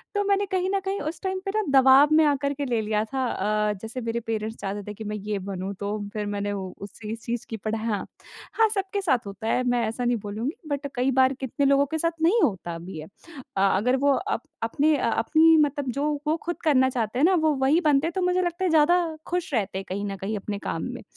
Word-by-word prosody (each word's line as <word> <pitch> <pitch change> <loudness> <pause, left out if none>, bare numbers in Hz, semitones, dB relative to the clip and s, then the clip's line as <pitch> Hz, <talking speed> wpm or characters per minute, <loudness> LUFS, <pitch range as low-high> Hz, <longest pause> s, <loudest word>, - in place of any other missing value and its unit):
तो 410 - +2
मैंने 400 0 +2
कहीं 370 0 0
न - - +2
कहीं 390 +1 -1
उस 310 +3 -5
टाइम 380 0 -1
पे 390 - -1
ना 435 - +3 0.2
दबाव 265 +2 +7
में 315 - +6
आकर 280 -1 +1
के 285 0 -3
ले 240 -3 0
लिया 210 0 0
था। 265 -1 0 0.4
अ, 210 - +1
जैसे 230 +3 -6
मेरे 230 0 -2
पेरेंट्स 220 -1 -4
चाहते 200 +1 -4
थे - - -7
कि 220 - -8
मैं - - -2
ये 210 0 -3
बनूँ, 190 +1 -4
तो 205 +1 -2 0.2
फिर 210 -2 -3
मैंने 205 0 -2
उ 190 -2 -4
उस 200 -1 -7
सी 220 0 -5
चीज़ 235 +1 -5
की 225 - -4
पढ़ा 215 +2 -3
हाँ, 215 -3 -2 0.5
हाँ 450 0 +4
सबके 390 0 -2
साथ 265 - +1
होता 200 +2 -6
है, 250 - +1
मैं 245 -2 +1
ऐसा 225 +3 -3
नहीं 240 0 +2
बोलूँगी 225 - -3
बट 285 0 -2
कई 255 +2 +1
बार 260 +1 +4
कितने 270 +2 -1
लोगों 280 0 +4
के - - +1
साथ 330 0 -2
नहीं 380 +8 +4
होता 175 -5 -1
भी 175 -1 -8
है। 155 - -8 0.5
अ, - - +2 0.2
अगर 250 +6 +2
वो 285 - +5
अप 400 +9 -2 0.2
अपने 295 +7 +2
अ, - - 0
अपनी 315 +8 +4
मतलब 285 -3 +1
जो 285 +4 -1 0.2
वो 315 +2 +2
खुद 345 +1 -4
करना 260 -4 +4
चाहते 240 -1 -2
हैं 290 - +5
ना, 375 +2 +4
वो 315 -2 +2
वही 270 +5 +3
बनते 300 -1 +3
हैं, - - -2
तो 380 - 0
मुझे 360 0 +2
लगता 350 +1 -2
है 370 - +2
ज़्यादा 325 +2 +5 0.3
ख़ुश 350 -4 -2
रहते 205 -5 -1
हैं 195 - -5
कहीं 200 +2 -3
न 195 -1 -4
कहीं 200 +3 -3
अपने 200 0 -5
काम - - -3
में। - - -8
260 Hz, 250 wpm, -25 LUFS, 215-315 Hz, 0.5 s, दबाव